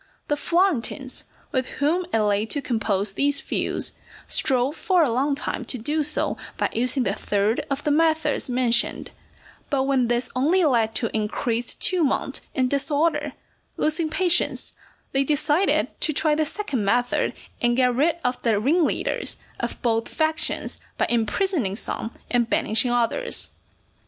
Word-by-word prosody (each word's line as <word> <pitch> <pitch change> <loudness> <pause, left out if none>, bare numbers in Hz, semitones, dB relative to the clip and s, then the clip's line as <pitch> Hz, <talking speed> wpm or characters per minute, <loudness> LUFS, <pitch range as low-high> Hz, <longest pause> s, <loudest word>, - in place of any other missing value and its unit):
The 295 - +2
Florentines, 295 -6 0 0.3
with 260 -1 0
whom 340 +5 +1
it - - +2
lay 210 +1 +1
to 285 - -1
compose 210 -6 0
these 285 +6 +1
feuds, 315 - -1 0.3
strove 260 +3 +2
for 365 -1 +2
a 270 - +1
long 275 +4 +1
time 275 - -3
to 250 - 0
do 295 +7 0
so 300 +1 +1 0.2
by - - 0
using 250 +3 +2
the 195 - 0
third 210 +6 0
of 275 +1 -2
the 300 - +1
methods 320 -2 +2
mentioned; 245 -1 +1 0.6
but 275 -2 +1
when 265 -3 +2
this 240 +1 0
only 325 +8 +3
led 230 -6 +2
to 230 - 0
increased 225 +2 -2
tumult 340 -7 +1
and 260 -3 +2
disorder, 290 +4 0 0.4
losing 310 +1 0
patience, 350 +1 +1 0.4
they 270 0 +2
decided 300 +6 +2
to 310 - +2
try 305 +2 +2
the 310 0 +1
second 290 - -2
method 245 +5 +1 0.3
and 240 0 +2
get 250 -1 +3
rid 310 +7 +2
of 250 0 -1
the 220 -4 +2
ringleaders 310 +9 +1 0.2
of - - -3
both 230 -1 +1
factions 315 0 -1 0.2
by - - +2
imprisoning 235 - 0
some 225 +1 -3 0.2
and 240 -2 +2
banishing 220 +3 +2
others. 245 - 0
265 Hz, 150 wpm, -24 LUFS, 235-310 Hz, 0.6 s, only